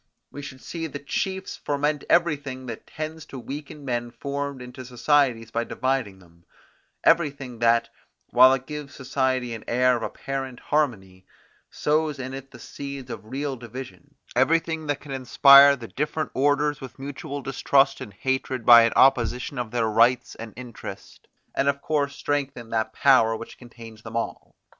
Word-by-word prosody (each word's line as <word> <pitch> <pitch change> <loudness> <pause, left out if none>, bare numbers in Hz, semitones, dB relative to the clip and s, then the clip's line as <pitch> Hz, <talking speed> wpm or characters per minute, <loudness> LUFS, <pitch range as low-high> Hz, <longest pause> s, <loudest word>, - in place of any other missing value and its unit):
We 145 - -8
should 130 -2 -9
see 165 -1 -4
the 145 - -6
chiefs 190 +7 -3
foment 145 +1 -1
everything 145 -6 +1
that 115 -3 -8
tends 155 0 -6
to 135 - -9
weaken 145 +3 -8
men 120 -2 -2
formed 140 +2 -4
into 125 +1 -9
societies 125 -2 +1
by 115 0 0
dividing 130 -7 -2
them; 85 -2 -22 0.6
everything 140 -7 +1
that, 115 0 +3 0.4
while 130 +2 +8
it 130 0 -8
gives 150 -2 -7
society 130 -2 -1
an 110 - -7
air 125 +1 +3
of - - -7
apparent 135 0 -5
harmony, 95 -11 -2 0.4
sows 150 0 0
in 130 0 -6
it 135 0 -8
the 130 - -13
seeds 140 0 -8
of - - -7
real 135 +3 -3
division; 120 -6 -10 0.2
everything 160 +4 +1
that 145 -1 -1
can 145 - -10
inspire 140 +2 +7
the 120 -4 -9
different 150 +4 -3
orders 145 +2 +1
with 130 - -9
mutual 140 +1 -6
distrust 135 +1 +2
and 105 - -7
hatred 130 -2 -2
by 120 -1 +10
an 115 0 +2
opposition 125 0 +3
of 120 -2 -3
their 120 0 0
rights 115 +3 +3
and 115 -1 -9
interest, 125 -3 -10 0.3
and 135 - 0
of 140 0 +1
course 145 -2 -1
strengthen 140 -6 -3
that 110 -1 0
power 115 -5 +4
which 115 - -10
contains 115 -3 -12
them 110 +1 -6
all. 115 - -5
130 Hz, 160 wpm, -25 LUFS, 120-145 Hz, 0.6 s, by